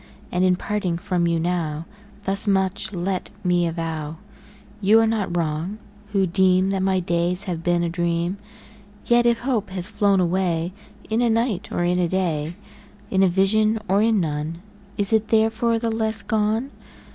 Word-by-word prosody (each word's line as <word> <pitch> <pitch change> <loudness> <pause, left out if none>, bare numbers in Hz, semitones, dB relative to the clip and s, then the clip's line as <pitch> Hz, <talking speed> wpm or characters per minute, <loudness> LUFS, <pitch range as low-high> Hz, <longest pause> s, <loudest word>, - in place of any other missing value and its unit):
And, 180 +1 +1
in 185 -1 +4
parting 185 -2 -2
from 180 -2 0
you 170 -1 +1
now, 165 -2 -2 0.4
Thus 195 +2 0
much 190 0 +1
let 185 0 -2
me 175 -1 +2
avow 160 -2 -4 0.7
You 215 +3 +6
are 225 - +4
not 210 -6 -1
wrong, 165 +5 -2 0.3
who 195 -2 +2
deem 185 +1 +3
That 195 -1 0
my 190 0 +2
days 175 +2 -1
have 175 -5 -4
been 175 0 +1
a - - +1
dream: 170 +2 -1 0.7
Yet 240 0 +4
if 235 -1 +2
hope 240 -5 -1
has 185 +2 -3
flown 205 -2 +3
away 175 -1 0 0.4
In 225 +2 +2
a 240 - +3
night, 225 -3 0
or 175 - 0
in 180 +1 +1
a 175 - +2
day, 170 -3 -1 0.6
In 190 - +3
a 190 - +6
vision 215 +4 +3
or 195 +2 +3
in 220 -1 +3
none, 160 +1 -3 0.3
Is 205 +1 -1
it 220 0 +3
therefore 225 +1 +2
the 230 0 -1
less 220 -1 -1
gone? 220 +4 0
190 Hz, 170 wpm, -23 LUFS, 175-215 Hz, 0.7 s, You